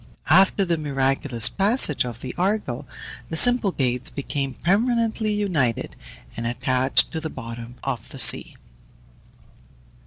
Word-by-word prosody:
After 190 +3 +4
the 170 -2 -1
miraculous 135 -4 +1
passage 200 - +2
of 120 -1 -8
the 130 - -6
Argo, 185 - -2 0.4
the 160 - -4
Symplegades 165 - +2
became 140 -1 -4
permanently 225 +2 0
united, 175 - -1 0.4
and 115 0 -4
attached 125 +1 0
to 160 - -5
the 160 - -5
bottom 115 0 -9
of 130 -5 -4
the - - -10
sea. - - +4
145 Hz, 120 wpm, -22 LUFS, 125-195 Hz, 0.4 s, After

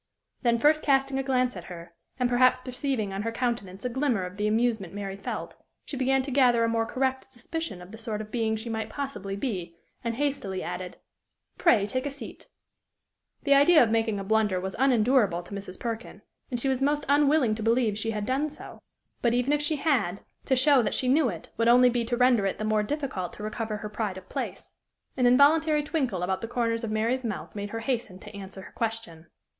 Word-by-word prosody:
Then 235 -2 +3
first 300 +5 +4
casting 270 -1 +2
a - - +2
glance 255 -3 +1
at 175 -2 -8
her, 170 -1 -10 0.3
and 250 - +3
perhaps 255 +1 +4
perceiving 255 -5 -2
on 195 - -3
her 230 +2 -2
countenance 230 -5 -3
a - - +1
glimmer 250 -5 0
of 180 +1 -8
the 210 0 0
amusement 220 -4 0
Mary 195 -1 -4
felt, 195 - -5 0.3
she - - -6
began 265 0 +2
to 275 - -5
gather 245 -3 +4
a - - +3
more 225 0 0
correct 265 0 -1
suspicion 260 - -6
of 180 - -13
the 220 - -10
sort 220 -2 -3
of 215 0 -7
being 225 -2 0
she 220 +2 -6
might 220 -1 -3
possibly 270 -6 -4
be, 185 -7 -4 0.3
and 230 -1 -2
hastily 260 -9 -2
added, 180 0 -5 0.6
"Pray, 225 - +4
take 255 +7 -2
a - - -1
seat." 280 - -9 1.0
The 280 - +4
idea 290 +2 +7
of 225 - 0
making 225 -2 +1
a - - -4
blunder 210 -2 +2
was 190 +1 -5
unendurable 240 -8 +3
to 190 - -11
Mrs. 195 -2 -7
Perkin, 230 -1 -5 0.3
and 245 -3 -2
she 270 - -1
was 265 -1 0
most 290 +1 +1
unwilling 285 -4 +4
to 220 - -5
believe 225 -1 +2
she 215 +2 -2
had 210 -2 -2
done 275 +6 0
so; 300 - -11 0.4
but, 235 -1 +2
even 250 +4 +1
if 295 - +1
she 295 +1 +1
had, 250 - 0 0.2
to 265 - +2
show 270 +1 +5
that 220 - -1
she 255 - 0
knew 275 -1 +4
it 170 -5 -8
would 230 - +2
only 250 +1 +6
be 240 0 0
to 240 +1 -1
render 245 -5 +4
it 195 - -2
the - - -4
more 215 0 +2
difficult 260 - -3
to 210 - -9
recover 215 0 -3
her 210 - -6
pride 210 -3 -3
of 185 0 -11
place. - - -5 0.4
An 250 -2 +3
involuntary 300 +4 +5
twinkle 260 - -1
about 190 +1 -1
the 225 - -4
corners 230 -1 -1
of 225 - -2
Mary's 230 +4 0
mouth 225 -3 -5
made 205 -1 -5
her 225 +2 -5
hasten 230 -6 -2
to 210 +2 -12
answer 195 -1 -9
her - - -12
question. 225 -8 -4
230 Hz, 220 wpm, -27 LUFS, 210-265 Hz, 1.0 s, idea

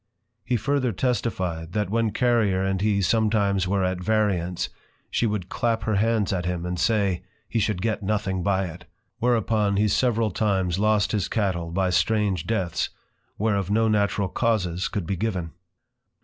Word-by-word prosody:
He 125 -1 0
further 130 +2 0
testify'd, 90 -8 -2
that 105 -3 -1
when 115 0 +2
Carrier 110 -5 +2
and 95 -1 0
he 100 -1 +2
sometimes 100 -3 +2
were 95 0 +1
at 90 -1 -1
variance, 90 -4 0 0.4
she 120 - +1
would 105 -4 -2
clap 115 +1 -1
her 110 -2 +1
hands 110 -1 +1
at 90 -2 -1
him, 90 -1 -2
and 90 -1 -3
say, 100 -4 +1 0.3
He 115 - -1
should 105 -3 -1
get 110 -1 0
nothing 100 -2 -1
by 95 +1 +1
it; 85 0 -9 0.3
whereupon 110 -4 +1
he 105 +1 +3
several 115 -1 +1
times 95 -3 0
lost 105 -1 +2
his 105 -4 0
Cattle, 95 -6 -1
by 95 +2 0
strange 95 0 +1
Deaths, 95 -7 -1 0.5
whereof 100 -3 0
no 110 +2 +3
natural 100 -2 +1
causes 95 -6 0
could 100 -6 -3
be 95 - -1
given. 90 -4 -2
100 Hz, 165 wpm, -25 LUFS, 90-110 Hz, 0.5 s, he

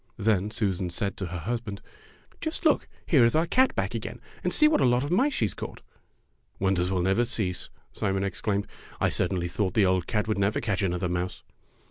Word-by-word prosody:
Then 105 -2 +1
Susan 95 -5 -1
said 100 +3 -2
to 95 - -3
her 90 +1 -5
husband, 105 +2 -4 0.6
''Just - - -3
look, - - +3 0.2
here - - +5
is 115 +3 +4
our 160 - +4
old 170 - -8
cat 260 +1 +4
back - - -1
again, - - -5 0.2
and - - 0
see 305 - +5
what 305 - +3
a 125 - +5
lot 125 +2 +2
of 145 - -3
mice 265 +11 +3
she 110 - +2
has 100 - -2
caught." - - -8 0.7
"Wonders 95 -2 +1
will 95 -2 0
never 95 +6 +3
cease!" 105 -7 -2 0.2
Simon 95 -1 -1
ex 100 -2 -3
claimed. 100 -2 0 0.3
"I - - +3
certainly 90 -1 0
thought 95 +1 -1
the 105 - +5
old 95 -1 +1
cat 105 -1 0
would 110 -2 0
never 100 +2 +1
catch 100 -4 -1
another 90 -1 0
mouse." 90 +1 -3
100 Hz, 215 wpm, -27 LUFS, 90-115 Hz, 0.7 s, here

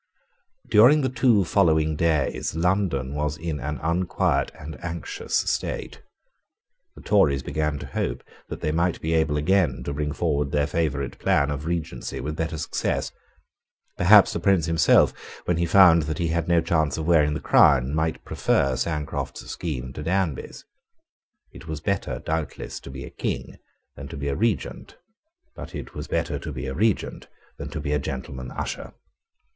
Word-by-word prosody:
During 125 +9 +6
the 130 - 0
two 120 -6 +3
following 80 -4 +2
days 75 -2 0
London 85 -6 0
was 75 +1 -2
in 80 -3 -4
an 75 +3 -3
unquiet 85 +3 +1
and 75 -3 -9
anxious 85 -1 -4
state. - - -2 0.9
The - - -13
Tories 75 -11 +3
began 75 -1 -1
to - - -7
hope - - -3 0.3
that - - -6
they 75 - 0
might 85 +2 0
be 80 +1 -2
able 80 -2 +2
again 75 -6 +1
to 70 - -4
bring 75 +1 -2
forward 75 -3 0
their 75 -1 +2
favourite 70 -4 -2
plan 75 -7 +2
of 75 +2 -4
Regency 85 -1 -3
with 75 +2 -4
better 80 0 -2
success. - - -2 0.8
Perhaps 100 +3 +6
the - - -2
Prince 90 -2 +3
himself, 80 -2 +4 0.3
when 90 - +1
he 85 0 +1
found 85 -2 +7
that 75 - -2
he 85 -2 -1
had 85 0 -1
no 85 -1 +4
chance 80 -4 0
of 80 - -3
wearing 75 -3 +3
the - - -2
crown, 70 -2 +4
might 80 +1 -1
prefer 65 -1 +1
Sancroft's 75 +3 -3
scheme 65 -6 -4
to 75 - -6
Danby's. 85 -4 -2 0.9
It - - -13
was 80 -1 -4
better 100 +4 -2
doubtless 80 -2 -3
to - - -11
be 65 0 -7
a - - -11
King - - -4 0.4
than 65 +1 -8
to 70 - -8
be 70 0 -3
a 70 - -1
Regent: 115 +3 -2 0.6
but - - -9
it - - -7
was - - -6
better - - -1
to - - -6
be - - -5
a 65 - -3
Regent 105 +7 -1 0.3
than - - -5
to - - -5
be 70 - -3
a 75 - +2
gentleman 65 -1 -5
usher. - - -5
80 Hz, 170 wpm, -24 LUFS, 70-85 Hz, 0.9 s, found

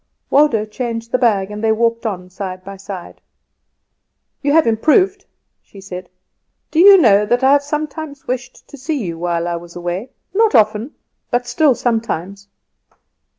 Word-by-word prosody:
Waldo 275 -7 +3
changed 230 +1 -5
the 255 - +1
bag, 205 -5 +1
and 210 +1 -6
they 220 - +3
walked 230 +1 0
on 180 -4 -5
side 185 -1 -6
by 195 +1 -9
side. 195 -2 -9 1.2
"You 285 - +1
have 325 0 +5
improved," 370 - +2 0.3
she 200 - -16
said. 185 -2 -8 0.6
"Do 320 - 0
you 395 +2 +9
know 210 - +5
that 245 +3 +1
I 265 - +5
have 285 0 +5
sometimes 295 0 -5
wished 255 0 -5
to 285 - -12
see 295 +4 -2
you 170 -9 -4
while 170 0 -1
I 170 -1 -2
was 170 0 -12
away; 175 +7 -4 0.2
not 435 -5 +3
often, 220 +4 +2 0.3
but 245 0 0
still 255 +2 +2
sometimes." 200 -5 -3
230 Hz, 160 wpm, -18 LUFS, 195-280 Hz, 1.2 s, you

